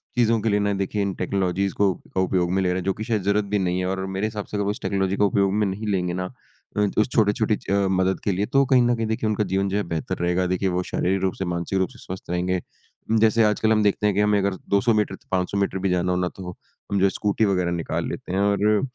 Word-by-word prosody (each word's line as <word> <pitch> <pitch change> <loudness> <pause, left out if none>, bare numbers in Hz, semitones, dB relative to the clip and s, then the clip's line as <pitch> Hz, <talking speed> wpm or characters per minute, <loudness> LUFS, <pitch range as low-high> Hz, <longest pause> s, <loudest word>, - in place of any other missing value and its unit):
चीज़ों 115 -2 +3
के 115 - 0
लिए 105 0 +2
ना, 100 0 +1
देखिए 100 +1 -2
इन 100 -1 -1
टेक्नोलॉजीज़ 95 0 -1
को 100 -2 +2 0.2
का 95 - +2
उपयोग 90 -1 +1
में 95 +1 +1
ले 90 - +1
रहा 90 - 0
है, 95 - -3
जो 95 - 0
कि 110 - -6
शायद 110 -3 -1
ज़रूरत 100 +1 +1
भी 100 0 0
नहीं 90 -1 0
है 90 - -1
और 95 0 -2
मेरे 100 +3 0
हिसाब 105 -2 -5
से 105 - -5
अगर 100 - 0
वो 100 - 0
उस 120 - -7
टेक्नोलॉजी 95 0 0
का 105 - +4
उपयोग 100 -1 +2
में 105 -1 +1
नहीं 105 +3 -4
लेंगे 90 -3 0
ना 90 0 -4 0.4
अ, - - +2 0.2
उस 110 +3 +3
छोटे-छोटे 110 0 +2 0.2
अ, 100 -1 +2
मदद 95 0 +1
के 100 - +1
लिए, 100 +3 0
तो 135 +3 +3
कहीं 130 -1 +4
न 120 0 +3
कहीं, 115 -1 -2
देखिए, 110 0 -1
उनका 105 0 +1
जीवन 95 +1 0
जो 100 - -1
है, 105 - 0
बेहतर 80 -3 -3
रहेगा। 90 +1 +1
देखिए, 95 +1 0
वो 90 0 -1
शारीरिक 95 +1 0
रूप 95 -1 0
से, 95 - -2
मानसिक 85 +2 -2
रूप 95 - +1
से - - -16
स्वस्थ 95 -2 -8
रहेंगे। 90 +1 0 0.6
जैसे 110 +1 +4
आजकल 110 +1 +2
हम 110 -1 +4
देखते 105 +1 +1
हैं 100 - +1
कि 105 - +3
हमें 105 0 +3
अगर 100 -1 0
200 100 +4 +3
मीटर, 105 -2 0 0.2
500 95 +1 0
मीटर 100 -1 0
भी 95 - +2
जाना 90 0 +1
हो 90 - +1
ना, 90 - 0
तो 90 -2 -8 0.4
हम 100 - +1
जो 95 - +4
है, - - +4
स्कूटी 105 +3 0
वगैरह 90 -3 +1
निकाल 85 -1 -2
लेते - - -6
हैं 95 - +1
और 100 +1 +2
अ - - 0
100 Hz, 285 wpm, -23 LUFS, 95-105 Hz, 0.6 s, का